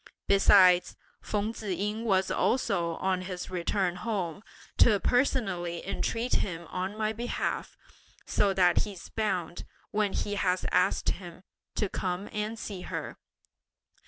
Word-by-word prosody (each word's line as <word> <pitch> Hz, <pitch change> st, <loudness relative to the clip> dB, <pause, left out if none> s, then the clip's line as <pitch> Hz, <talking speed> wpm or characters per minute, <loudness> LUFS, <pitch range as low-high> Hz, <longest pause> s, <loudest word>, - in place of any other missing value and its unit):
Besides, 190 Hz, -2 st, +6 dB, 0.3 s
Feng 210 Hz, +1 st, -2 dB
Tzu 220 Hz, -, -8 dB
ying 210 Hz, +5 st, -2 dB
was 190 Hz, -3 st, +2 dB
also 175 Hz, -9 st, +1 dB
on 185 Hz, 0 st, 0 dB
his 180 Hz, -1 st, -6 dB
return 180 Hz, 0 st, 0 dB
home, 200 Hz, -5 st, -3 dB, 0.4 s
to 215 Hz, -4 st, +6 dB
personally 195 Hz, -11 st, 0 dB
entreat 230 Hz, +4 st, 0 dB
him 170 Hz, -3 st, -3 dB
on 190 Hz, +3 st, -3 dB
my 215 Hz, 0 st, 0 dB
behalf, 240 Hz, +2 st, -3 dB, 0.5 s
so 200 Hz, -, +2 dB
that 180 Hz, -2 st, +4 dB
he's 195 Hz, -5 st, -5 dB
bound, 180 Hz, -6 st, -2 dB, 0.3 s
when 210 Hz, -2 st, +1 dB
he 205 Hz, -, -2 dB
has 185 Hz, -2 st, 0 dB
asked 180 Hz, +2 st, +2 dB
him, 175 Hz, -1 st, -6 dB, 0.3 s
to 210 Hz, -, +1 dB
come 185 Hz, +1 st, -3 dB
and 210 Hz, +1 st, -2 dB
see 200 Hz, -4 st, -6 dB
her. -, -, -5 dB
195 Hz, 130 wpm, -29 LUFS, 180-215 Hz, 0.5 s, Besides